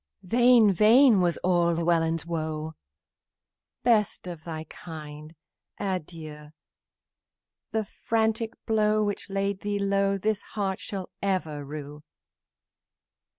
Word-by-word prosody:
Vain, 235 +1 +5
vain 220 +3 +6
was 175 -2 +1
all 175 -2 +3
Llewellyn's 165 -1 +1
woe; 160 -1 -3 1.1
"Best 220 -6 +2
of 170 -3 -8
thy 160 -2 -5
kind, 155 -1 -10 0.4
adieu! 155 -5 -5 1.2
The 220 -1 -1
frantic 225 +2 -1
deed 215 -1 +2
which 205 -1 -2
laid 195 0 -1
thee 205 0 -2
low 195 0 +1
This 215 +1 -1 0.2
heart 195 -2 -1
shall 195 -3 -6
ever 170 -7 -1
rue!" 145 +1 -8
190 Hz, 105 wpm, -27 LUFS, 160-210 Hz, 1.2 s, vain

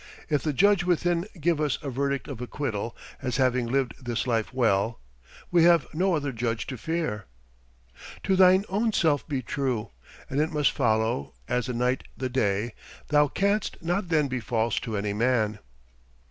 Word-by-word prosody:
If 150 -2 +2
the 155 - 0
Judge 200 +5 +4
within 175 0 +1
give 160 0 +1
us 150 -3 +1
a 140 - -3
verdict 140 +1 -1
of 130 -5 -7
acquittal 120 -4 -3 0.2
as 125 -2 -2
having 125 -2 +2
lived 130 +1 -1
this 120 -1 -2
life 115 -3 0
well, 115 -3 +1 0.5
we 175 -2 +5
have 170 -2 +5
no 180 +3 +2
other 145 -3 -1
Judge 115 -1 -2
to 130 - -6
fear. 155 - -2 1.0
"To 190 - +2
thine 185 +1 +6
own 215 +4 0
self 155 -7 +2
be 135 -4 -2
true, 125 -3 -2 0.4
And 140 +3 0
it 155 - +1
must 150 -4 +2
follow, 110 - 0
as 125 0 0
the 125 - -2
night 125 +2 0
the 130 0 -2
day, 110 -2 0 0.4
Thou 150 0 +5
canst 200 +7 0
not 175 +2 -1
then 155 -3 +3
be 130 -1 -2
false 115 -1 0
to 115 -4 -4
any 100 0 -1
man." 110 -2 +1
135 Hz, 175 wpm, -26 LUFS, 115-160 Hz, 1.0 s, thine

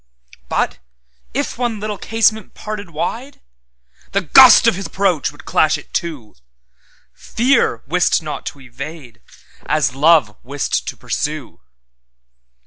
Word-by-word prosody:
But, - - -1 0.5
if 230 - -3
one 240 -4 -2
little 210 -1 -5
casement 220 -2 0
parted 210 -3 -7
wide, 235 - -5 0.7
The 200 - +2
gust 250 - +8
of 230 - +5
His 195 +2 -5
approach 190 -8 0
would 145 - -16
clash 155 -1 +2
it - - -15
to. 150 -11 -4 0.8
Fear 240 - 0
wist 175 +5 +2
not 150 - -6
to 140 - -7
evade, 135 0 -10 0.5
as 150 -4 +1
Love 145 -6 +3
wist 140 +2 -3
to - - -5
pursue. 150 - -4
165 Hz, 125 wpm, -18 LUFS, 140-215 Hz, 0.8 s, gust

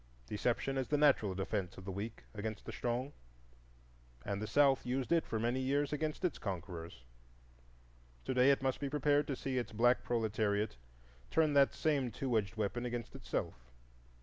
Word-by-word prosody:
Deception 125 - -1
is 130 - -2
the 150 - +2
natural 135 -10 +4
defence 95 -1 -2
of 95 - -10
the 95 - -4
weak 105 +4 -5
against 110 0 -5
the - - -5
strong, 125 +4 -2 1.1
and 100 0 -2
the 110 - -3
South 140 0 +4
used 130 +3 -2
it 170 -1 +3
for 110 - -1
many 120 +3 0
years 140 +2 +1
against 155 +3 -2
its 175 - -1
conquerors; 85 - -6 1.2
to - - -1
day 125 +1 +5
it 140 -1 +3
must 130 -1 0
be 140 - -2
prepared 145 +1 +2
to 140 - -1
see 130 0 -2
its 120 - -4
black 120 +3 +3
proletariat 110 -2 0 0.5
turn 155 -2 +3
that 140 -1 +6
same 145 -5 +1
two 125 +2 -2
edged 105 -1 0
weapon 110 +3 -1
against 120 -1 -4
itself. - - -4
120 Hz, 175 wpm, -35 LUFS, 105-140 Hz, 1.2 s, that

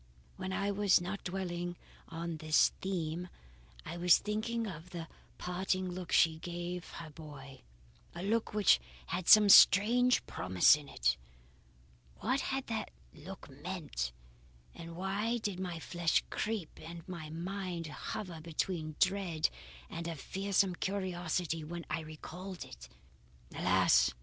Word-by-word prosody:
"When 185 0 -4
I 200 +1 0
was 200 -1 +4
not 190 +3 -5
dwelling 175 -2 -3 0.3
on 165 0 -4
this 155 0 +4
theme, 175 -2 -2 0.6
I 165 +2 -5
was 175 0 +6
thinking 225 +2 -2
of 180 -3 -7
the 170 -2 -6 0.3
parting 185 +1 -1
look 180 -1 -6
she 160 -2 +5
gave 175 +1 -5
her 160 -2 -8
boy; 145 -3 -11 0.5
a 175 - -5
look 225 +3 0
which 210 -1 +5 0.3
had 180 -1 -3
some 215 -1 +9
strange 235 +6 +7
promise 95 +5 +4
in 150 -2 -9
it. 60 +1 +1 1.0
What 255 +5 0
had 270 0 -2
that 220 -2 -3 0.2
look 185 +6 -10
meant 145 - -4 0.6
and 165 0 -9
why 200 +6 -1
did 205 -5 -3
my 180 -3 -3
flesh 170 0 +1
creep 215 -7 -3
and 165 +1 -9
my 170 -4 -6
mind 175 +1 -4
hover 170 +2 -6
between 160 -1 -2
dread 185 -5 +2 0.4
and 165 0 -5
a 165 - -3
fearsome 195 +4 0
curiosity 175 -4 -2
when 170 +2 -6
I 155 - 0
recalled 175 +4 -8
it? - - -12 0.6
Alas! - - +4
175 Hz, 135 wpm, -33 LUFS, 160-195 Hz, 1.0 s, some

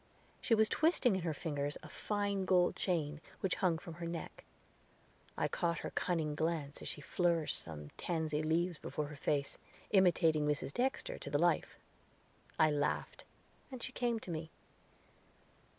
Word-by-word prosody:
She 230 - +4
was 220 0 +5
twisting 280 - +3
in 190 - -1
her 165 -1 0
fingers 145 -2 -2
a - - -8
fine 205 -2 -1
gold 180 -1 +4
chain, 155 -5 -1 0.2
which 190 - +1
hung 175 -4 +3
from 170 0 -8
her 170 - -2
neck. 170 0 -6 0.9
I - - +2
caught 170 -1 0
her - - -3
cunning 160 -4 0
glance 155 -2 -1
as - - -6
she - - -5
flourished 170 +1 +1
some 75 -3 -8
tansy 160 -3 -1
leaves 165 +2 +1
before 150 - -3
her 150 - -8
face, 140 0 -1 0.3
imitating 165 -6 +4
Mrs. 145 -1 -1
Dexter 260 +2 -1
to - - -6
the 145 - +2
life. 170 +1 +2 0.8
I 155 -1 +5
laughed, 145 0 -1 0.5
and 255 -2 -6
she - - -3
came 240 -2 0
to 180 - -6
me. 160 0 -4
165 Hz, 160 wpm, -35 LUFS, 150-185 Hz, 0.9 s, was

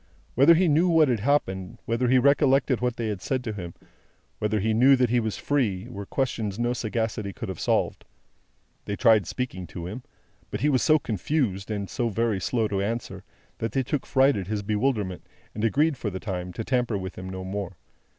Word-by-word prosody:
Whether 140 +7 +6
he 180 +2 +3
knew 165 +4 +3
what 160 -4 +5
had 120 -3 +1
happened, 95 -7 0
whether 115 +2 0
he 130 +2 +5
recollected 135 -1 +3
what 125 -1 0
they 115 - -3
had 105 -4 -3
said 130 +4 -2
to 110 -3 -3
him, 90 -4 -7 0.6
whether 105 0 0
he 110 +3 +1
knew 130 +5 +6
that 125 -3 +1
he 120 - +3
was 110 -2 -2
free, 115 -8 0
were 100 -5 -7
questions 110 -7 -2
which 120 - -1
no 120 +1 +1
sagacity 110 -3 -2
could - - -7
have - - -6
solved. - - 0 0.8
They 100 - -3
tried 110 -5 +4
speaking 95 -8 -4
to 85 0 -7
him; 105 +8 -6 0.5
but, 105 - -4
he 150 - +3
was 130 -4 +2
so 155 - +5
confused, 110 - -2
and 100 -2 -3
so 120 +6 -1
very 110 -1 0
slow 115 +2 0
to 100 -1 -1
answer, 115 +3 -4 0.4
that 115 -2 -3
they 135 - +1
took 135 +2 -3
fright 135 +1 +4
at 95 -3 -4
his 105 0 -2
bewilderment, 105 -3 -1 0.3
and 105 - -4
agreed 145 +6 +2
for 110 - -3
the 95 -1 -5
time 90 -3 -4
to 115 - -4
tamper 125 -3 0
with 95 -1 -6
him 95 0 -7
no 95 0 -6
more. 95 -2 -5
115 Hz, 210 wpm, -26 LUFS, 100-130 Hz, 0.8 s, Whether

